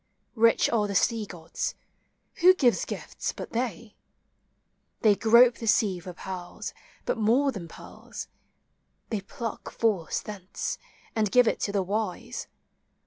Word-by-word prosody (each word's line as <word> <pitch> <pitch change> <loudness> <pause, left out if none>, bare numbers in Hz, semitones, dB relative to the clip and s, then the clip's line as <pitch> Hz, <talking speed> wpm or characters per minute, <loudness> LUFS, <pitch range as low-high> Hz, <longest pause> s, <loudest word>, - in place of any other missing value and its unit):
Rich 230 0 +4
are 215 -3 +2
the 200 - -4
sea 220 +2 +2
gods: 165 -3 -4 0.3
— - - -46
who 370 +2 +8
gives 250 -9 +3
gifts - - -4
but - - -7
they? 230 -2 -3 1.1
They 215 -3 +5
grope 235 +3 +6
the 230 - -5
sea 205 -4 +3
for 180 +1 -8
pearls, 180 0 -6 0.3
but - - -1
more 250 +6 +3
than 190 -8 -7
pearls: - - -9 0.8
They 215 -3 -1
pluck 230 +2 -6
Force 205 -8 0
thence, 200 -3 -5 0.4
and 215 -2 +2
give 250 -2 +6
it - - +1
to 200 - -1
the 200 -2 +1
wise. 215 +4 -3
220 Hz, 140 wpm, -27 LUFS, 195-235 Hz, 1.1 s, who